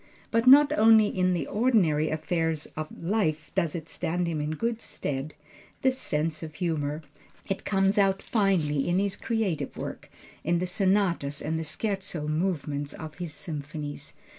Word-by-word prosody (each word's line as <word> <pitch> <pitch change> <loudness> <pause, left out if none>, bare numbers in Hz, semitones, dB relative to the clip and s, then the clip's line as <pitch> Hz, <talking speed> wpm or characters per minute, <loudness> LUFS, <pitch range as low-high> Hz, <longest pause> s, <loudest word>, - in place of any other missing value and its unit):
But 230 +2 +2
not 285 +3 +8
only 220 -5 +6
in 185 -2 +1
the 175 - -1
ordinary 200 -10 +2
affairs 160 0 -1
of 155 0 -3 0.2
life 165 -5 0
does 170 -5 0
it 165 -2 -5
stand 175 +1 -2
him 165 -3 -2
in 150 +1 -2
good 230 +4 -2
stead, 140 +2 -4 0.5
this 260 -1 +3
sense 155 +2 -1
of 155 -1 -7
humor. 155 -3 -2 0.4
It 195 - -3
comes 195 +1 +2
out 195 -1 +3
finely 175 - +1
in 175 +1 +2
his 200 0 +1
creative 220 -8 -2
work - - -6 0.3
in 170 +2 +2
the 180 - -1
sonatas 185 -6 +1
and 160 +1 -2
the - - -2
Scherzo 180 -1 -2
movements 150 -3 -1
of 155 +2 -9
his 175 -3 -4
symphonies. 150 -1 -6
170 Hz, 160 wpm, -27 LUFS, 155-195 Hz, 0.5 s, not